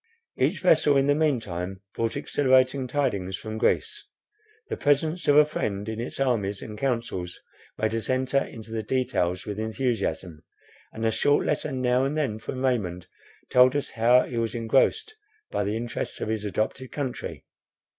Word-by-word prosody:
Each - - 0
vessel 145 -2 +4
in 135 - +3
the 145 - +4
mean 150 -4 +2
time 95 -1 -5
brought 115 +2 -1
exhilarating 130 -2 +2
tidings 105 -9 -1
from 110 0 -6
Greece. 425 - 0 0.6
The - - -3
presence 155 +4 +1
of 145 - +5
a 150 0 +8
friend 105 -9 -3
in 110 0 -4
its 120 - -5
armies 105 -7 0
and 105 - -7
councils 115 -8 -2 0.4
made 110 0 0
us 115 -1 -2
enter 130 +1 +2
into 110 -1 -10
the 110 -1 -2
details 95 -7 -1
with 105 0 -5
enthusiasm; 110 - -2 0.5
and 110 0 -4
a 110 - +3
short 145 +6 +2
letter 150 0 -1
now 130 -1 +1
and 140 +3 -1
then 130 -8 -1
from 130 +4 -4
Raymond 90 -9 -1 0.5
told 125 +1 +6
us 145 - -2
how 120 +2 +4
he 120 - -4
was 115 +1 -2
engrossed 135 - +1 0.4
by - - 0
the 105 +2 -1
interests 120 +1 -4
of - - -3
his 110 -1 -2
adopted 110 +5 -2
country. 135 -4 -5
120 Hz, 170 wpm, -26 LUFS, 110-135 Hz, 0.6 s, a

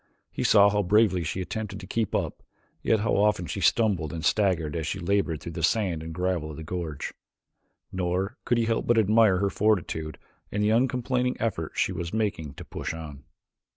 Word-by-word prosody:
He - - -3
saw 100 0 +6
how 105 0 +2
bravely 100 -2 +3
she 90 +4 -3
attempted 100 +1 -5
to 100 - -9
keep 110 +2 -1
up, - - -2 0.4
yet 110 -2 +2
how 115 - +1
often 105 -3 +2
she 75 - -4
stumbled 95 -10 +2
and 80 -2 -5
staggered 90 -8 +1
as 80 -2 -2
she - - -2
labored 85 -3 0
through 85 - -6
the 80 - -5
sand 90 -2 +1
and 80 0 -6
gravel 90 -2 -1
of 75 - -8
the 80 - -7
gorge. 80 -3 -4 0.8
Nor 95 +4 -1
could 120 - +1
he 115 - +2
help 115 0 -1
but 120 - +4
admire 110 -2 +5
her 100 +1 0
fortitude 85 -7 0 0.3
and 105 0 0
the 105 - +3
uncomplaining 125 +1 +1
effort 95 -8 -2
she - - +1
was 85 +4 -4
making 95 -10 -2
to - - -9
push - - -5
on. 75 -4 -9
95 Hz, 195 wpm, -26 LUFS, 80-110 Hz, 0.8 s, saw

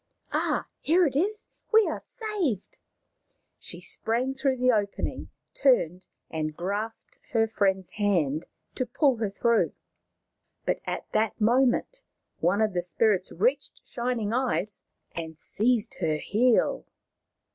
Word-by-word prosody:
" - - -52
Ah, - - 0
here 345 +4 +4
it 275 - -1
is. 415 +8 0 0.3
We 440 -1 +6
are - - -2
saved! 400 - -3 0.4
" - - -51 0.3
She - - -8
sprang 245 +4 -1
through 270 -1 0
the 255 0 +4
opening, 205 -3 -2 0.2
turned, 185 - +2 0.2
and 155 -1 -3
grasped 205 +5 -4
her 225 -1 +4
friend's 195 -4 0
hand 170 -8 0 0.3
to 255 - -2
pull 275 -6 +2
her 215 -2 -1
through. 235 +3 +2 0.9
But - - 0
at - - -3
that 215 +1 0
moment 255 - +2 0.4
one 205 - +2
of 215 -2 0
the 175 - 0
spirits 190 +1 +2
reached - - 0
Shining 235 -3 -2
Eyes 215 -6 0 0.3
and 160 -1 -5
seized 225 +6 0
her 160 -4 +1
heel. 230 +8 +2
225 Hz, 135 wpm, -27 LUFS, 190-260 Hz, 0.9 s, We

